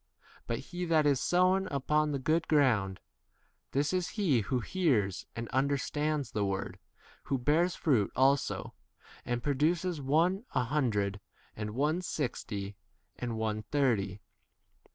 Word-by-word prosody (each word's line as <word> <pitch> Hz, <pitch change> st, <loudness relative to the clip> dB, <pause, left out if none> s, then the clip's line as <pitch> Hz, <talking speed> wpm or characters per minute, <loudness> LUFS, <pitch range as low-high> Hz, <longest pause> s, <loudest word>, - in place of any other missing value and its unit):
But 115 Hz, -, -1 dB
he 175 Hz, +7 st, -5 dB
that 160 Hz, -3 st, +3 dB
is 140 Hz, -3 st, +3 dB
sown 185 Hz, +2 st, +3 dB
upon 150 Hz, +2 st, +1 dB
the 140 Hz, -, 0 dB
good 160 Hz, +5 st, +1 dB
ground 115 Hz, -11 st, +2 dB, 0.4 s
— -, -, -43 dB
this 145 Hz, +5 st, +1 dB
is 180 Hz, -2 st, 0 dB
he 165 Hz, -, +3 dB
who 125 Hz, +4 st, -1 dB
hears 120 Hz, -, 0 dB
and 115 Hz, 0 st, -4 dB
under 140 Hz, +2 st, +2 dB
stands 150 Hz, +1 st, -2 dB
the 105 Hz, -3 st, -1 dB
word, 95 Hz, -1 st, -3 dB, 0.5 s
who 135 Hz, -, 0 dB
bears 160 Hz, +7 st, +2 dB
fruit 125 Hz, -, +2 dB
also, 135 Hz, +2 st, +2 dB, 0.5 s
and 120 Hz, -1 st, -2 dB
produces, 160 Hz, +4 st, +1 dB
one 165 Hz, -, +2 dB
a -, -, +3 dB
hundred, 110 Hz, -7 st, 0 dB, 0.4 s
and 105 Hz, 0 st, -5 dB
one 150 Hz, +6 st, +1 dB
sixty, 105 Hz, -, -4 dB, 0.4 s
and 120 Hz, -2 st, -3 dB
one 110 Hz, -1 st, -1 dB
thirty. 105 Hz, -5 st, 0 dB
140 Hz, 140 wpm, -31 LUFS, 110-155 Hz, 0.5 s, that